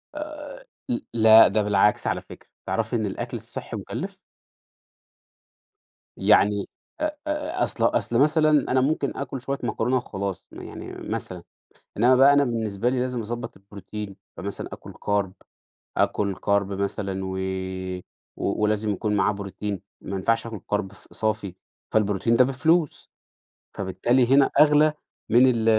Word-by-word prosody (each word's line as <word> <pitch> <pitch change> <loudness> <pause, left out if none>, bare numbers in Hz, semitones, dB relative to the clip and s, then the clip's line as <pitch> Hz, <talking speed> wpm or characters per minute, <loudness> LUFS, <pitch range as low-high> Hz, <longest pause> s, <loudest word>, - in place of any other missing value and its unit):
آآ، 305 +1 -5 0.6
ل 245 - +1 0.2
لأ 110 -2 +8
ده 105 +2 +1
بالعكس، 105 0 +2
على - - -1
فكرة، - - -14 0.2
تعرفي - - -1
إن - - 0
الأكل - - -4
الصحّي - - -7
مُكلِّف؟ - - -6 2.0
يعني 100 -1 +3 0.3
أ - - +2 0.2
أ 300 +4 -1
أصل - - 0
أصل 120 - +1
مثلًا 155 +1 +4 0.2
أنا 130 0 +4
ممكن 140 0 0
آكل 135 -2 -4
شوية 140 +2 -2
مكرونة 125 +2 0
وخلاص، 100 -6 -4
م - - -9
يعني - - -8 0.2
مثلًا، - - -4 0.5
إنّما 125 +4 +5
بقى 135 +2 +7
أنا 145 0 +4
بالنسبة 115 -2 -1
لي 130 0 0
لازم 125 -1 -1
أضبط 115 +2 -5
البروتين، 100 +1 -8 0.2
فمثلًا 100 +3 -5
آكل - - -9
كارب، 100 -2 -1 0.6
آكل 100 -2 +1
كارب 100 +1 0
مثلًا 100 0 -2
و 95 0 -4 1.0
و - - -2
ولازم 105 0 +1
يكون 105 +2 -1
معاه 100 +1 +3
بروتين، 100 0 -5 0.2
ما 100 - -5
ينفعش 115 +4 +1
آكل 110 -4 -6
كارب 105 -2 -1
ف 95 - -16
صافي، 105 -4 -2 0.4
فالبروتين 105 +1 +2
ده 125 - +6
بفلوس، 155 +5 +1 0.7
فبالتالي 100 +7 +1
هنا 140 0 +5
أغلى 150 0 +6 0.4
من 125 +3 +6
ال 110 -1 -1
110 Hz, 140 wpm, -25 LUFS, 100-130 Hz, 2.0 s, لأ